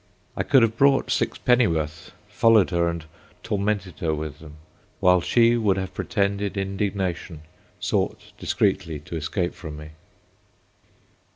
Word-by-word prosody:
I - - -1
could 135 -4 +4
have 115 0 +1
bought 140 0 +4
sixpenny 125 -1 +2
worth, 80 -1 -3 0.2
followed 110 -5 +4
her, 85 -1 +2
and 85 -2 -5 0.4
tormented 100 -4 -2
her 80 -2 0
with 75 0 -6
them; 75 -1 -12 0.4
while 90 -1 +4
she 115 +5 +4
would 100 -4 +2
have 95 -1 -4
pretended 100 0 -1
indignation—sought, 95 -5 -3
discreetly, 80 -2 0
to 80 - -8
escape 85 +3 -2
from 75 -3 -8
me. 75 0 -9
95 Hz, 125 wpm, -24 LUFS, 80-105 Hz, 0.4 s, could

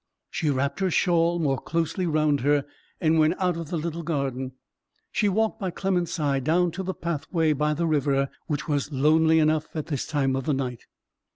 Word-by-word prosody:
She 155 - -1
wrapped 140 +3 0
her 190 -1 +1
shawl 170 -1 +2
more 140 -5 0
closely 165 +3 -1
round 155 -2 +2
her, 145 +1 +2 0.3
and 160 -2 +3
went 155 +3 +4
out 180 -2 +1
of 165 -2 -6
the 175 - -2
little 165 +1 -3
garden. 135 -5 -2 0.6
She 210 - +2
walked 220 +3 0
by 190 -3 -2
Clement's 180 -1 -1
side 140 -5 0
down 170 +4 +2
to 185 - -5
the 190 0 -3
pathway 165 -1 0
by 150 +1 0
the 170 +3 0
river, 140 -3 +1 0.2
which 150 +1 -2
was 145 -1 -1
lonely 160 +3 +4
enough 155 0 +1
at 155 - -2
this 145 -5 -3
time 135 -4 +1
of 135 -1 -3
the 150 - +1
night. 125 -3 -4
155 Hz, 195 wpm, -25 LUFS, 140-170 Hz, 0.6 s, went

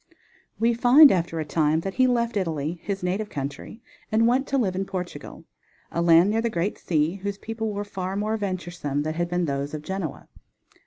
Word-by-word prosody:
We 230 +1 +2
find 250 +5 +7
after 170 -2 -1
a 155 - -2
time 155 +1 +1
that 195 +2 -4
he 255 +3 +3
left 235 -2 0
Italy, 165 -3 -2
his 195 -2 -4
native 195 +4 -1
country, 145 - -6 0.3
and 220 +1 +3
went 255 +3 +2
to 275 - 0
live 195 -8 0
in 190 - -1
Portugal, 185 -2 -7 0.5
a 170 - -1
land 170 +3 +5
near 225 +1 +1
the 235 - 0
great 190 0 -2
sea, 160 +2 0
whose 200 +1 -4
people 225 0 -4
were 205 0 -3
far 190 -1 -4
more 210 +2 -1
venturesome 175 -8 -3
than 155 +1 -2
had 175 +1 -2
been 175 0 0
those 140 0 -3
of 150 - -7
Genoa. 190 -4 -5
190 Hz, 200 wpm, -25 LUFS, 165-220 Hz, 0.5 s, find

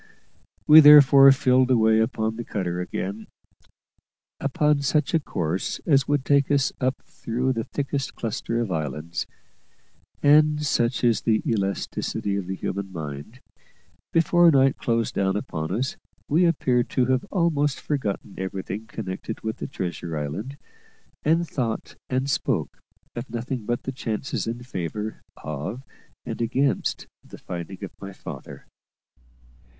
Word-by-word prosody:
We 155 +5 +10
therefore 140 -2 +9
filled 130 -1 +3
away 110 -3 +4
upon 110 -1 0
the 120 - -5
cutter 90 -5 -3
again, 100 +4 -5 1.1
upon 150 0 +1
such 150 +3 +1
a 165 - +4
course 90 - -2
as 140 -4 +3
would 145 -2 0
take 140 -1 +3
us 140 -2 +2
up 130 +1 -1
through 125 +3 -2
the 115 -2 -3
thickest 140 -1 -3
cluster 115 0 -3
of 115 -5 -2
islands; 80 +1 -3 1.0
and, 150 +1 +5
such 120 -3 0
is 120 -2 +3
the 110 -2 +1
elasticity 100 -1 -2
of 100 -3 -3
the 95 - -3
human 95 0 -4
mind, 80 - -7 0.7
before 170 +1 +5
night 135 -3 +4
closed 115 -2 0
down 95 -1 0
upon 80 -6 -4
us 130 +3 -2 0.3
we 165 +5 +3
appeared 125 -7 +1
to 125 - +1
have 130 +1 +1
almost 155 -6 +1
forgotten 110 -9 -3
everything 95 +3 -5
connected 110 0 -6
with 110 0 -4
the - - -5
treasure 85 -3 -4
island, 95 - -5 0.6
and 165 +3 +2
thought 120 -7 -3 0.2
and 130 +1 0
spoke 140 - -1 0.4
of 120 +1 -6
nothing 120 0 -4
but 120 +1 -2
the 135 - -3
chances 125 -1 -3
in 120 +2 -4
favour 105 -1 -5 0.2
of 75 - -5 0.4
and - - -5
against 130 +4 0 0.2
the - - -12
finding 90 +3 -7
of 95 - -5
my 100 0 -7
father. - - -10
120 Hz, 140 wpm, -24 LUFS, 100-140 Hz, 1.1 s, We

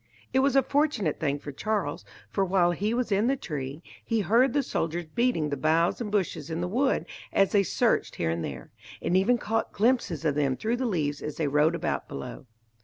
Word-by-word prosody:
It 260 - +4
was 275 0 +3
a 270 - +6
fortunate 275 - 0
thing 145 -2 0
for 145 0 -8
Charles, 195 - -2 0.3
for 195 - +1
while 180 -2 +3
he 205 +5 -1
was 240 -1 -1
in 200 +4 +3
the 270 - +3
tree, 150 - -5 0.2
he 225 -1 0
heard 235 +7 +4
the 285 -1 +2
soldiers 170 -7 -2
beating 165 -4 0
the 145 - -1
boughs 165 - +2
and 210 -3 -3
bushes 170 -7 -1
in 160 0 -3
the 175 - -1
wood 260 +8 +1 0.3
as 195 -1 +3
they 205 - +5
searched 195 - +1
here 80 -1 0
and 85 0 -2
there, 65 -3 -7 0.3
and 170 - 0
even 195 +6 +4
caught 225 0 -2
glimpses 210 - +1
of 150 - +3
them 140 -3 0
through 230 +2 -1
the 255 0 -1
leaves 150 -8 -1
as 150 - -5
they 155 - 0
rode 150 +4 +3
about - - -2
below. 70 - -7
180 Hz, 215 wpm, -27 LUFS, 150-230 Hz, 0.3 s, a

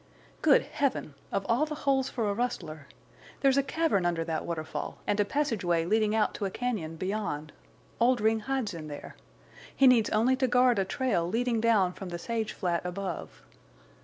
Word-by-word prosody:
"Good - - +5
Heaven! 275 - -2 0.2
Of 195 - -1
all 245 +7 +2
the 300 - -4
holes 270 -1 +2
for 230 -4 -2
a 200 - +1
rustler!... 170 - -3 0.5
There's 275 0 +4
a - - +5
cavern 280 - 0
under 170 -1 0
that 160 -1 -3
waterfall, 160 -2 -4
and 205 - 0
a 205 - +4
passageway 195 - 0
leading 215 +3 +2
out 220 - +2
to 205 - -3
a - - 0
cañon 195 -8 -3
beyond. 185 -6 -3 0.5
Oldring 225 -2 +3
hides 250 -3 -2
in 160 -2 -7
there. 145 -1 -8 0.6
He 275 - +4
needs 245 -4 +5
only 235 +5 +3
to 260 -1 +2
guard 250 -2 +4
a 195 - +1
trail 190 -6 0
leading 230 +2 0
down 210 -6 +3
from 190 -1 -8
the 175 - -4
sage 225 +3 -3
flat 175 -3 -1
above. 180 -1 -5
215 Hz, 180 wpm, -29 LUFS, 175-250 Hz, 0.6 s, Good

